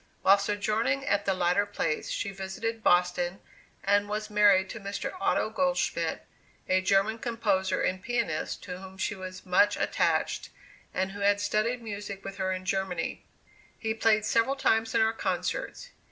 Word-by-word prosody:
While 200 +1 +6
sojourning 215 +6 0
at 205 -3 +1
the 195 - +1
latter 180 +3 +2
place, 180 -6 -2
she 200 - -2
visited 195 +4 -4
Boston 180 -1 +2 0.4
and 205 +1 +2
was 215 +1 -3
married 205 -2 +5
to 230 - -7
Mr. 200 0 -4
Otto 390 - +1
Goldschmidt, 270 +3 0 0.4
a 185 0 +3
German 195 +4 +2
composer 225 -5 0
and 185 0 0
pianist, 235 -11 -2
to 180 -1 -6
whom 190 0 -11
she 195 - -1
was 185 -1 -8
much 195 +3 +4
attached, - - 0 0.4
and 190 +1 -1
who 200 - -8
had 200 0 +3
studied 215 +4 0
music 205 -2 -6
with 195 0 -6
her 190 -1 -1
in 185 0 -4
Germany. 190 -1 -2 0.5
He 220 -1 -2
played 220 -1 +2
several 230 +5 +2
times 225 -4 +1
in - - +4
our 220 0 +3
concerts. - - -3
205 Hz, 160 wpm, -28 LUFS, 190-220 Hz, 0.5 s, While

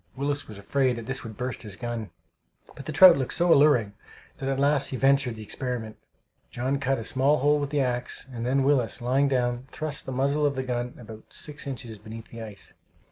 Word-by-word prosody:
Willis 145 +1 -2
was 105 - -9
afraid 130 +5 +1
that 115 -1 -7
this 135 +1 -3
would 110 -3 -9
burst 125 0 -4
his 105 -4 -8
gun, 120 -2 -5 0.7
but 135 - -10
the - - -2
trout 175 0 +8
looked 130 - -2
so 175 -1 +4
alluring 140 -8 +4 0.4
that 135 - -3
at 135 0 -1
last 140 0 +3
he 130 - -4
ventured 135 -2 +3
the 110 - -8
experiment. 115 -1 -4 0.5
John 130 +3 -1
cut 135 0 +1
a 115 - -5
small 135 +6 +2
hole 145 +2 +3
with 145 -1 -2
the 145 -1 +1
axe, 125 0 -2
and 115 -1 -4
then 135 +3 +2
Willis, 135 -5 +2
lying 130 +4 +2
down, 125 -1 0
thrust 155 -2 -5
the - - -3
muzzle 140 +3 +1
of 145 -1 +2
the 130 - -2
gun 125 -1 -3
about 110 -2 -11
six 150 -1 -3
inches 115 -5 -5
beneath 110 +1 -10
the 115 - -9
ice. 105 -3 -9
130 Hz, 215 wpm, -26 LUFS, 120-140 Hz, 0.7 s, trout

